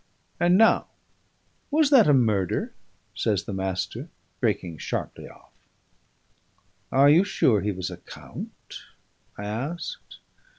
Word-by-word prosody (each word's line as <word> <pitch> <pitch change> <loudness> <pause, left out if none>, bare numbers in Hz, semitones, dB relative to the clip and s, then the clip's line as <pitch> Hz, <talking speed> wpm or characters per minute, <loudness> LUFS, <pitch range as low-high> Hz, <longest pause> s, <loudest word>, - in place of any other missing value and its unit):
And 175 +1 +4
now, 225 +1 +4 0.8
was 300 0 +3
that 255 -7 +7
a 145 - +5
murder?" 105 -8 +1 0.4
says 100 -3 0
the 100 - -6
Master, 95 -1 -3 0.3
breaking 85 -3 -1
sharply - - -5
off. - - -19 1.4
"Are 135 +2 +5
you 160 +6 +6
sure 115 - +2
he 105 +2 -1
was 95 -2 -4
a - - -8
count?" - - -10 0.6
I 100 - -6
asked. 130 +12 -5
115 Hz, 120 wpm, -25 LUFS, -, 1.4 s, that